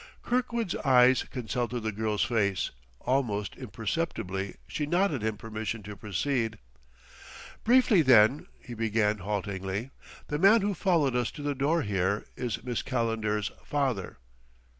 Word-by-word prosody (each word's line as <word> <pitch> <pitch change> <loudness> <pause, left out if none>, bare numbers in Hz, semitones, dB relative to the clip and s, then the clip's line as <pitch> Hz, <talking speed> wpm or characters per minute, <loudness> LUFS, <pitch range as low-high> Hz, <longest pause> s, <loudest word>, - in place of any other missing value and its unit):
Kirkwood's 235 -5 -1
eyes 130 -2 +5
consulted 120 0 -3
the 110 0 -2
girl's 105 0 0
face; 100 -5 0 0.3
almost 115 -6 -1
imperceptibly 100 - -3
she 145 - -3
nodded 175 - +1
him 110 -1 -1
permission 110 0 -5
to 105 +1 -8
proceed. 110 +3 -1 1.1
"Briefly, 235 -5 +5
then," 125 -1 +5
he 125 - -10
began 110 -2 +1
haltingly, 100 +3 -3 0.3
"the 150 - -3
man 205 +5 +6
who 200 +1 0
followed 160 -8 +2
us 125 -1 +1
to 145 - -9
the 145 0 0
door 145 +5 +1
here, 100 0 0
is 120 -3 -3
Miss 125 -2 -2
Calendar's 115 -4 -1
father." 130 -10 -2
115 Hz, 130 wpm, -28 LUFS, 105-145 Hz, 1.1 s, man